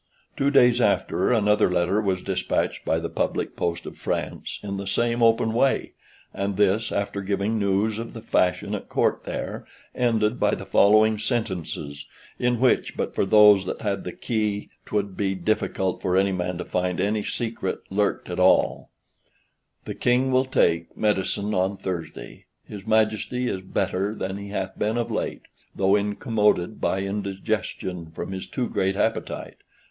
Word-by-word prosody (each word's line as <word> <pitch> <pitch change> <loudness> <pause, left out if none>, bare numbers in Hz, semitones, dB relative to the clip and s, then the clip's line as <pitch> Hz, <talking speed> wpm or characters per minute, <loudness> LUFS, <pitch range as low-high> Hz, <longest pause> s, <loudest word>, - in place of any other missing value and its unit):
Two 140 - +2
days 125 -3 +5
after 105 - +2
another 105 -3 +3
letter 90 +3 +1
was 95 -3 -1
despatched - - -1
by 80 - +1
the 85 0 -2
public - - -2
post 85 -1 -2
of - - -8
France, - - -3
in 100 -1 -4
the 100 0 -5
same 120 +4 0
open 115 -1 +3
way, 130 +3 +1 0.4
and 100 0 -2
this, 105 +2 +2
after 100 0 -2
giving 100 +3 -1
news 100 +2 +1
of 115 - -6
the 115 - -8
fashion 90 -1 +1
at - - -5
Court - - +1
there, - - -4 0.3
ended 115 -1 +1
by - - +2
the - - -8
following 110 +1 +4
sentences, 90 - -3 0.3
in 125 -1 +1
which, 130 0 +2
but - - -2
for 95 - 0
those 105 -2 +6
that - - -4
had 100 -3 -2
the 90 - -5
key, 105 -2 -2 0.2
'twould 100 -2 -2
be 95 -1 -1
difficult 95 -1 -1
for 90 0 +1
any 100 +1 +3
man 90 -1 -2
to - - -5
find 90 0 -1
any 105 +2 0
secret 110 -5 -3
lurked 100 +1 0
at - - -4
all: - - +3 1.0
"(The - - -4
King 125 +2 +2
will 130 +1 +3
take) 85 -10 +1
medicine 105 0 0
on 95 +1 0
Thursday. 90 -4 -6 0.2
His 105 0 -10
Majesty 110 +3 +1
is 95 -5 -2
better 95 +2 -1
than 95 -1 -4
he 100 0 -7
hath 95 -1 -4
been 110 +3 0
of 120 - -2
late, - - -3 0.3
though 95 +1 +3
incommoded 105 -1 +1
by 95 +1 0
indigestion 95 -3 -3
from - - -5
his 95 -1 -5
too 125 -2 -2
great 95 0 0
appetite. 110 +2 -2
100 Hz, 165 wpm, -24 LUFS, 95-110 Hz, 1.0 s, those